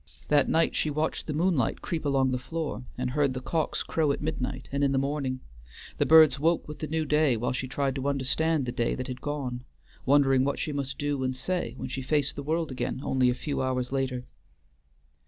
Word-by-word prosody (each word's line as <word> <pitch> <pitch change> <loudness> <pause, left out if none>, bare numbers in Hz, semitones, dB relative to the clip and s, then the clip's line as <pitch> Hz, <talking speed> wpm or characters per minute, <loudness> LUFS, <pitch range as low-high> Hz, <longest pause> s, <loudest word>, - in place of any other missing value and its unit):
That 145 -2 +4
night 165 +1 +2
she 155 - +1
watched 155 +2 -2
the 150 - -2
moonlight 155 -6 +1
creep 165 -3 -3
along 135 -2 +2
the 125 - -1
floor, 155 -1 -4
and 125 0 -2
heard 140 -1 +1
the - - -2
cocks 160 +4 -1
crow 155 -3 +1
at - - -2
midnight 135 -3 -3
and 140 +1 0
in 140 -1 +3
the - - +2
morning; 135 -1 -1 0.6
the - - +2
birds 155 -4 +7
woke 165 +3 +1
with 150 - -8
the 155 - -3
new 160 +1 -1
day 150 -4 +3
while 120 - -1
she 130 +1 -3
tried 135 +1 -1
to 135 +1 -2
understand 140 +2 +1
the 120 - -2
day 120 -1 0
that 130 - -4
had 125 0 -6
gone, 135 -4 -3 0.4
wondering 135 -2 +5
what 140 - 0
she 155 - -2
must 140 -1 -3
do 145 -2 -1
and 130 0 -1
say 135 -2 -2
when - - -4
she 130 +1 -4
faced 145 +1 0
the 145 - -4
world 160 +1 -1
again 125 0 -3
only 130 -1 +2
a 125 - +1
few 145 +1 -3
hours 130 -1 -1
later. 130 -2 -1
140 Hz, 220 wpm, -28 LUFS, 130-150 Hz, 0.6 s, birds